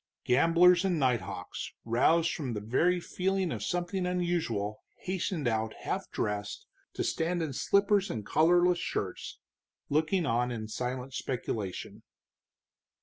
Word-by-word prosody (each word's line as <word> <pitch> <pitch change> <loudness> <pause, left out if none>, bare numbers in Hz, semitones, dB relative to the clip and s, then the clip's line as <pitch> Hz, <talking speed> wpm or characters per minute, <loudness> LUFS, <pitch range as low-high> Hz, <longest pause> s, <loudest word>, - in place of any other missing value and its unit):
Gamblers 170 +7 +5
and 185 -3 +1
nighthawks, 125 -5 -2
roused 160 +9 +3
by 130 -6 -3
the 105 - -2
very 160 +12 +2
feeling 190 0 -1
of 110 - -4
something 180 - -1
unusual, 165 - -1 0.2
hastened 185 - -2
out 110 -1 -1
half - - -3
dressed, 105 0 -3 0.3
to - - -2
stand 170 +1 0
in 150 -4 -3
slippers 200 +6 +2
and 110 -3 -4
collarless 175 +2 +4
shirts, - - -4 0.5
looking 160 +4 +1
on 120 -1 +1
in 110 -3 -4
silent 125 +3 -4
speculation. 110 -8 -4
160 Hz, 125 wpm, -30 LUFS, 120-180 Hz, 0.5 s, Gamblers